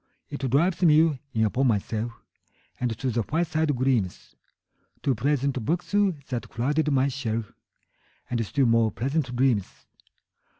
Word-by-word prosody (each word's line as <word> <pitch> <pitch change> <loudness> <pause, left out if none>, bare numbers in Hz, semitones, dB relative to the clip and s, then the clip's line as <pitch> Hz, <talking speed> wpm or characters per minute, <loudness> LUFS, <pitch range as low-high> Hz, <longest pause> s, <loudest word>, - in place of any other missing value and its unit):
It 140 -2 -3
drives 170 +9 +2
me 155 -3 +4
in 110 -3 +1
upon 130 +5 +1
myself 110 +1 -1
5 - - -26 0.6
And 120 -3 -1
to 130 +1 -1
the 115 +1 0
fireside 155 +2 0
gleams, 125 -7 -1 0.7
To 135 - +2
pleasant 140 -2 0
books 170 +9 -2
that 160 -12 0
crowd 145 +6 0
my 135 0 +3
shelf, 115 -5 -3 0.8
And 120 -2 -1
still 135 +6 +1
more 115 -2 +3
pleasant 130 +4 -2
dreams. 120 -6 0
130 Hz, 135 wpm, -26 LUFS, 115-150 Hz, 0.8 s, me